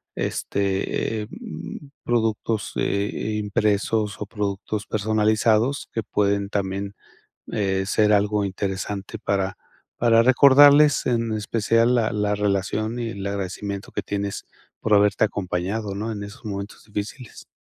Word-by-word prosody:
este, 100 +2 -1
em, 195 - -9
productos, 110 -2 0
eh 100 +1 0
eh, 110 +1 -3
impresos 105 0 0
o - - -2
productos 105 0 -3
personalizados, 110 +4 +1
que 115 - -1
pueden 100 -1 0
también, 100 0 -3 0.6
eh, 95 -2 0
ser 105 0 +3
algo 105 0 +2
interesante 100 +2 -4
para 100 -1 -1 0.4
para 115 -1 +5
recordarles, 140 +3 +7
en 115 -2 0
especial 115 +3 +2
la 115 -2 +1
la 105 0 0
relación 105 +3 -1
y 115 - -2
el 100 -3 -6
agradecimiento 100 0 -4
que 105 - -3
tienes 100 +1 -3 0.4
por 110 -1 +2
haberte 100 +1 +4
acompañado, 100 +1 -2
¿no?, 110 +2 -3
en 100 -1 -5
esos 100 +1 -10
momentos 100 -1 -6
difíciles. 105 +4 -7
105 Hz, 125 wpm, -23 LUFS, 100-115 Hz, 0.6 s, recordarles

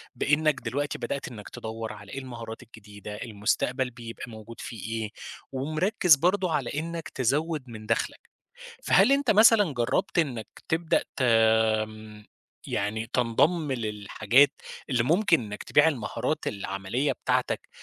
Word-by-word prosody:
بإنك 150 +4 +2
دلوقتي 140 +6 -2
بدأت 140 - -4
إنك 105 -4 -9
تدوّر 110 0 -6
على 105 -1 -12
إيه 135 - -4
المهارات 115 -3 -8
الجديدة، 105 -3 -10
المستقبل 120 +4 -1
بيبقى 115 -1 -9
موجود 110 +1 -10
فيه 115 -5 -7 0.2
إيه، 105 - -4 0.4
ومركّز 155 +6 +3
برضو 180 +4 +1
على 145 -6 -1
إنك 165 +2 -4
تزوّد 145 +4 0
من 110 -2 -9
دخلك، 115 +1 -1 0.6
فهل 275 - +5
أنت 275 -5 +3
مثلًا 210 -6 +6
جربت 120 +7 0
إنك 125 -9 -1 0.2
تبدأ 160 0 +1
ت - - -4
آمم، 110 -2 +2 0.4
يعني 110 +3 -2
تنضم 145 +6 +2
للحاجات 110 +3 +2 0.4
اللي 120 -3 +2
ممكن 170 - +3
إنك 105 -2 -7
تبيع 145 +2 +4
المهارات 145 +3 -2
العملية 100 +7 -2
بتاعتك - - -1
120 Hz, 130 wpm, -27 LUFS, 110-155 Hz, 0.6 s, مثلًا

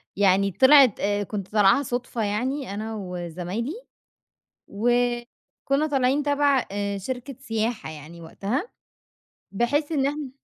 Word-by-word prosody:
يعني 195 0 +3
طلعت 260 - +6
أ 205 0 0
كنت 200 -1 -5
طالعاها 210 +5 +4
صُدفة 245 -2 -3
يعني 245 +4 -2
أنا 220 +2 -4
وزمايلي. 180 - -4 1.0
وكُنّا 245 +5 -1
طالعين 275 -1 +1
تَبَع 285 -2 +2
آآ، 200 0 -2
شركة 250 +5 -6
سياحة 225 -4 -2
يعني 155 +2 -11
وقتها. 205 - -3 0.8
بحيث 285 +9 0
إن 275 -3 +1
إحنا 290 -1 -4
235 Hz, 115 wpm, -24 LUFS, 200-270 Hz, 1.0 s, طلعت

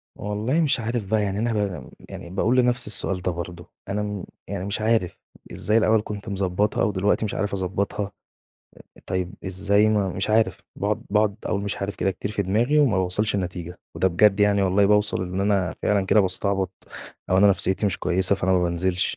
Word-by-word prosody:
والله 105 +10 -1
مش 145 -5 +2
عارف 115 -3 -3
بقى 110 -1 +2
يعني 100 0 -2
أنا 115 +1 0
ب 100 -4 -3 0.2
يعني 85 - -9
بأقول 110 +7 +1
لنفسي 125 -1 +2
السؤال 95 -2 0
ده 90 - -1
برضه، 85 0 -7 0.2
أنا، 105 +1 -1
إمم، 105 -3 -4 0.2
يعني 100 -2 -4
مش 100 +2 -1
عارف، 110 -5 +1 0.3
إزاي 105 +1 +1
الأول 110 -1 +3
كنت 105 +1 -6
مضبطها 100 +1 0
و 105 - +2
دلوقتي 100 +3 +1
مش 105 - -4
عارف 100 +1 -2
أضبطها؟ 100 +1 -2 0.9
آآ، - - -16
طيب 95 +1 -3
إزاي 100 +3 +2
ما 105 -3 +1
مش 95 +3 -2
عارف! 110 -6 +2 0.2
باقعد 105 +2 -1
باقعد 105 0 +2
أقول 100 - -1
مش 100 - -2
عارف 100 +1 -4
كده 95 - 0
كتير 95 +2 -5
في 105 -1 -1
دماغي 115 +10 +1
وما 135 -9 +3
باوصلش 100 +4 0
لنتيجة، 90 -2 -4 0.2
وده 95 - +2
بجد 100 +3 +3
يعني 100 -1 +3
والله 95 +1 +3
بأوصل 105 -1 +2
إن 90 +1 -3
أنا 100 -2 +1
فعلًا 100 -2 +1
كده 105 - +5
باستعبط 95 -1 0 0.6
أو 95 - +4
أنا 105 - +6
نفسيتي 95 0 +2
مش 100 - -1
كويسة، 95 +2 +2
فأنا 95 -1 0
ما 95 - +4
بانزلش، 90 +2 0
100 Hz, 195 wpm, -24 LUFS, 95-105 Hz, 0.9 s, أنا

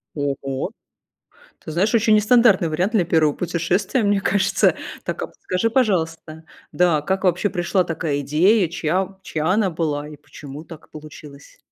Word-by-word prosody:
Ого. 135 -2 -3 0.9
Ты - - -9
знаешь, 195 +8 0
очень 220 -1 +4
нестандартный 210 -5 +4
вариант 180 +8 -1
для 200 -6 +2
1 160 -3 +2
путешествия, 180 +7 -1
мне 205 -1 +2
кажется. 195 0 +2 0.3
Так, - - -4
а - - -2
подскажи, 185 +5 -2
пожалуйста, 165 -9 -1 0.3
да, 175 -4 +2
как 190 +5 -2
вообще 180 +2 +2
пришла 180 0 0
такая 155 -3 -2
идея, 175 +8 +3
чья 185 +4 -2
чья 155 -4 -3
она 195 +1 +2
была 150 -3 -3
и 150 - -10
почему 145 +1 -11
так 165 -1 -13
получилось? 150 -2 -13
175 Hz, 150 wpm, -21 LUFS, 155-195 Hz, 0.9 s, очень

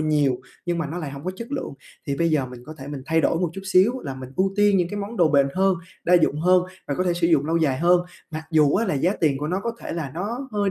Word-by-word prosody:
nhiều 150 -4 +2 0.3
nhưng 175 -1 0
mà 160 - -1
nó 165 +5 -5
lại 150 -4 -5
hổng 140 +2 -9
có 185 - -1
chất 235 +5 -8
lượng. 270 - -4 0.3
Thì 140 - -1
bây 170 +1 +1
giờ 145 -4 +1
mình 125 -1 -11
có 155 - -8
thể 135 +1 -8
mình 145 -2 -6
thay 160 0 +2
đổi 165 - +2
một 180 - +1
chút 195 +2 -7
xíu 195 +7 +3
là 135 - -5
mình 130 -1 -9
ưu 190 +1 +2
tiên 205 -1 +4
những 175 -2 +1
cái 205 - -5
món 205 +4 -6
đồ 170 -5 +4
bền 140 -2 +4
hơn, 190 0 +3 0.3
đa 180 - +4
dụng 155 -3 +3
hơn 180 +1 +4 0.3
và 140 - 0
có 185 - -1
thể 180 - +2
sử 170 -1 +1
dụng 155 -4 +3
lâu 165 +1 +1
dài 140 -6 +1
hơn, 175 +2 +4 0.3
mặc 155 0 -5
dù 150 -3 +4
á, 225 +2 +2
là 185 - 0
giá 170 +8 +2
tiền 145 -4 +2
của 150 - -3
nó 180 +4 -1
có 235 - -2
thể - - -5
là 155 -5 -4
nó 235 +10 -4
hơi 205 -1 +1
170 Hz, 310 wpm, -23 LUFS, 145-190 Hz, 0.3 s, tiên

